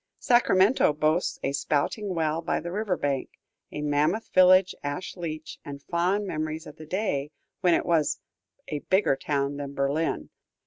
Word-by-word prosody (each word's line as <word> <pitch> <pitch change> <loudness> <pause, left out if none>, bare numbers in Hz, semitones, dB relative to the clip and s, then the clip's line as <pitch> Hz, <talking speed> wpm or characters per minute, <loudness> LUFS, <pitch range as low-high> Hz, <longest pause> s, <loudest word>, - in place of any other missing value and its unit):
Sacramento 220 - +4
boasts 155 +4 +1
a 135 - 0
spouting 160 +8 -1
well 160 0 0
by 165 - -1
the 175 - -6
river 200 -2 -1
bank, 140 -2 -1 0.4
a 150 - -5
mammoth 150 +9 +1
village 185 0 +6
ash 145 +6 -4
leach, 155 -3 -6
and 140 -1 -8
fond 180 +4 0
memories 155 -2 -3
of 150 - -11
the 155 - -11
day 155 -7 -1 0.3
when 180 -3 +4
it - - 0
was 160 -3 +1 0.5
"a 150 - -2
bigger 190 -2 +2
town 140 0 -1
than 140 -1 -6
Berlin." 140 +4 -1
160 Hz, 160 wpm, -27 LUFS, 145-185 Hz, 0.5 s, village